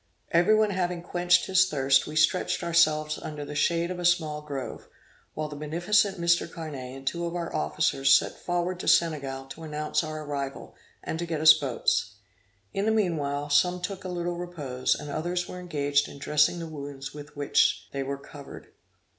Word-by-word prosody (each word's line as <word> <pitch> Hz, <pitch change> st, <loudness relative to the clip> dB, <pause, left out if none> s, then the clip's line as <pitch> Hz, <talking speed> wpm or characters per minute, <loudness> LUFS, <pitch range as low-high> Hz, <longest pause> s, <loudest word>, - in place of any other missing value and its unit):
Every 175 Hz, +6 st, +5 dB
one 215 Hz, -1 st, +3 dB
having 180 Hz, -2 st, -2 dB
quenched 180 Hz, 0 st, +2 dB
his 190 Hz, 0 st, +4 dB
thirst, 135 Hz, -2 st, +3 dB
we 150 Hz, -, -7 dB
stretched 155 Hz, +3 st, +2 dB
ourselves 155 Hz, -3 st, +2 dB
under 150 Hz, -1 st, -6 dB
the 145 Hz, -, -7 dB
shade 170 Hz, +3 st, +1 dB
of 180 Hz, -, -5 dB
a -, -, -4 dB
small 160 Hz, -4 st, +1 dB
grove, 140 Hz, -4 st, -6 dB, 0.5 s
while 155 Hz, 0 st, -2 dB
the 150 Hz, -, -8 dB
beneficent 175 Hz, +7 st, +1 dB
Mr. 170 Hz, 0 st, +2 dB
Carnet 140 Hz, -6 st, -7 dB
and 135 Hz, -, -12 dB
two 170 Hz, +5 st, -1 dB
of 170 Hz, -, -5 dB
our 170 Hz, -1 st, -4 dB
officers 75 Hz, -, +1 dB
set -, -, +4 dB
forward 175 Hz, +1 st, -2 dB
to -, -, -6 dB
Senegal 140 Hz, -5 st, +2 dB
to 135 Hz, +4 st, -9 dB
announce 150 Hz, 0 st, -2 dB
our 155 Hz, 0 st, -5 dB
arrival, 140 Hz, -2 st, -5 dB, 0.3 s
and 160 Hz, -, -4 dB
to 170 Hz, -, -3 dB
get 160 Hz, -2 st, -2 dB
us 155 Hz, 0 st, +9 dB
boats. 120 Hz, -6 st, -1 dB, 0.6 s
In 195 Hz, -, -1 dB
the 220 Hz, -, +3 dB
meanwhile 150 Hz, -9 st, -1 dB
some 180 Hz, +5 st, +3 dB
took 190 Hz, +2 st, -5 dB
a 185 Hz, -, -5 dB
little 175 Hz, -1 st, -3 dB
repose, 145 Hz, -8 st, -1 dB
and 150 Hz, -1 st, -7 dB
others 175 Hz, +4 st, -2 dB
were 180 Hz, -, -7 dB
engaged 145 Hz, -5 st, 0 dB
in -, -, -11 dB
dressing 150 Hz, +4 st, +2 dB
the 170 Hz, -, -5 dB
wounds 140 Hz, -3 st, -7 dB
with 145 Hz, 0 st, -11 dB
which 145 Hz, -1 st, +2 dB
they 140 Hz, -, -3 dB
were 140 Hz, +1 st, -3 dB
covered. 140 Hz, 0 st, -12 dB
155 Hz, 190 wpm, -27 LUFS, 145-175 Hz, 0.6 s, us